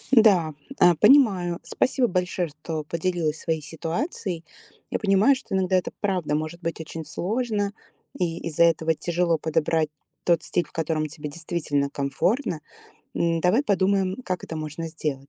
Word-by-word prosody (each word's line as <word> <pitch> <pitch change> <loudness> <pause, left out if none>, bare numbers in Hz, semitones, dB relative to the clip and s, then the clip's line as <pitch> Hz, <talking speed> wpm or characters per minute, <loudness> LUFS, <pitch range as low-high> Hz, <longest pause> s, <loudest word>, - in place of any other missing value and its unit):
Н-да, 185 -9 +5 0.3
а, 175 -1 +7
понимаю. 195 - +5
Спасибо 255 -1 +1
большое, 180 -1 -1
что 155 +1 -5
поделилась 165 -1 -1
своей 160 -2 -1
ситуацией. 165 - -4 0.4
Я - - -1
понимаю, 205 +7 +4
что 265 - -8
иногда 185 0 +2
это 185 - +1
правда 185 -7 0
может 155 +3 -4
быть 165 0 -3
очень 160 0 -6
сложно, 205 - -1 0.4
и 170 -2 -1
из-за 165 +1 +3
этого 160 -1 +3
тяжело 170 0 0
подобрать 160 0 +1 0.3
тот 170 -2 +2
стиль, 175 - 0
в - - -21
котором 155 -1 -1
тебе 150 0 -7
действительно 150 -3 -2
комфортно. 155 - -1 0.5
М, 165 -1 +1
давай 195 - +3
подумаем, 195 -3 +1
как 185 -2 -2
это 160 - -6
можно 155 +2 -5
сделать. 145 -4 -4
170 Hz, 150 wpm, -25 LUFS, 155-190 Hz, 0.5 s, а